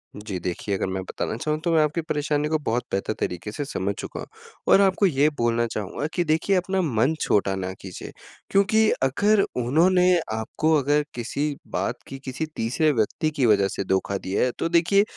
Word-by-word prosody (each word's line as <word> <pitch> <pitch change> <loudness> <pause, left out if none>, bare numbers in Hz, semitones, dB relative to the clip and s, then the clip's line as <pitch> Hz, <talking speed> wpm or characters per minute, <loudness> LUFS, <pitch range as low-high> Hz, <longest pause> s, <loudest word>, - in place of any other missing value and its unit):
जी 105 -3 -5
देखिए, 90 +3 -3
अगर 95 - -2
मैं 95 0 -3
बताना - - -4
चाहूँ 150 +4 -1
तो 170 - +1
मैं 160 - +5
आपकी 150 +3 -1
परेशानी 150 -1 -1
को 155 +1 +1
बहुत 120 +2 0
बेहतर 100 +2 -1
तरीके 90 +4 -3
से 145 - -4
समझ 100 -7 -2
चुका - - -6
हूँ - - -7 0.5
और 195 - +7
आपको 195 +1 +3
ये 150 -4 +3
बोलना 120 0 +1
चाहूँगा 110 +6 -4
कि 175 - +1
देखिए 165 +5 +1
अपना 190 +1 0
मन 130 -3 +1
छोटा 100 -1 +2
ना 95 -1 -3
कीजिए। 95 -2 -8 0.4
क्योंकि 215 +2 +4
अगर 205 +11 +3 0.2
उन्होंने 180 +8 +4 0.2
आपको 110 +8 0
अगर 145 +2 +2
किसी 140 +5 -2
बात - - -2
की, 135 - -8
किसी 135 +3 -4
तीसरे 130 +7 +1
व्यक्ति 120 +5 0
की 135 - +2
वजह 100 -3 +4
से 100 - -3
धोखा 95 +1 0
दिया 95 0 -1
है। 125 - +1
तो 165 - 0
देखिए, 175 +4 +4
140 Hz, 195 wpm, -24 LUFS, 105-165 Hz, 0.5 s, और